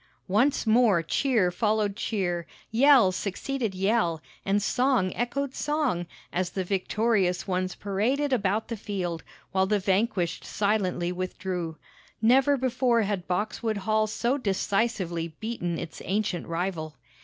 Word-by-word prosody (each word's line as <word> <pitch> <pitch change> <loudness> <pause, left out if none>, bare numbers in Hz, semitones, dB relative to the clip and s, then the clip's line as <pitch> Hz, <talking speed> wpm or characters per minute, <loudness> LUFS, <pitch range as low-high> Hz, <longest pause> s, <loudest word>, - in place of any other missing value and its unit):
Once 245 +10 +2
more 220 -6 +4
cheer 215 - +2
followed 210 0 +1
cheer, 175 -6 -2 0.2
yell 245 -4 +6
succeeded 205 +4 -3
yell, 190 -4 +1 0.2
and 200 +1 +2
song 245 -2 +1
echoed 265 +3 -2
song, 295 - -1 0.3
as 180 0 0
the 190 0 -3
victorious 195 0 +1
ones 185 -1 -1
paraded 250 +9 0
about 210 -2 +1
the 230 - -3
field, 185 -6 -3 0.3
while 190 0 +2
the 210 +1 +2
vanquished 190 -2 0
silently 195 -4 0
withdrew. 180 -2 -4 0.4
Never 265 +5 +4
before 250 -2 +2
had 195 -3 -2
Boxwood 215 +4 -1
Hall 215 +2 +1
so 240 +5 0
decisively 195 - -1
beaten 195 -7 -3
its 165 -2 -7
ancient 200 -2 -1
rival. 165 -2 -3
200 Hz, 125 wpm, -27 LUFS, 180-235 Hz, 0.4 s, yell